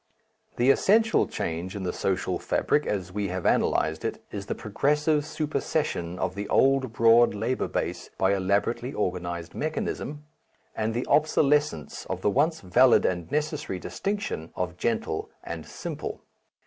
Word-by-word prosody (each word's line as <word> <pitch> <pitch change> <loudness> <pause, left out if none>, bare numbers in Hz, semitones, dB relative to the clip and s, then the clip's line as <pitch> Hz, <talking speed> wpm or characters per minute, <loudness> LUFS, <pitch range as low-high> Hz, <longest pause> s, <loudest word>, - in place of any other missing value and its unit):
The 125 +3 +5
essential 220 +9 +3
change 85 +3 -4
in 100 - -4
the 90 - -2
social 95 -1 -1
fabric, 150 - +1
as 95 -3 -2
we 100 +1 -2
have 90 -1 -4
analyzed 80 0 +2
it, - - -3
is 100 -1 -6
the - - -2
progressive 150 +7 +1
supersession 150 - -2
of 95 -1 -1
the 100 +1 -5
old 135 -2 +3
broad 115 -1 +5
labour 115 +5 -1
base - - -3
by 95 +1 +3
elaborately 100 +6 0
organized 85 -4 -3
mechanism, 150 -1 -3 0.5
and 110 +1 -1
the 120 - -1
obsolescence 150 - +2
of - - -4
the 105 - +2
once 155 +7 +1
valid 115 +7 +5
and 85 +1 -1
necessary 150 - -1
distinction 195 - -3
of 90 -1 -3
gentle 110 -5 -2
and 85 -2 -6
simple. - - -6
110 Hz, 145 wpm, -27 LUFS, 90-145 Hz, 0.5 s, The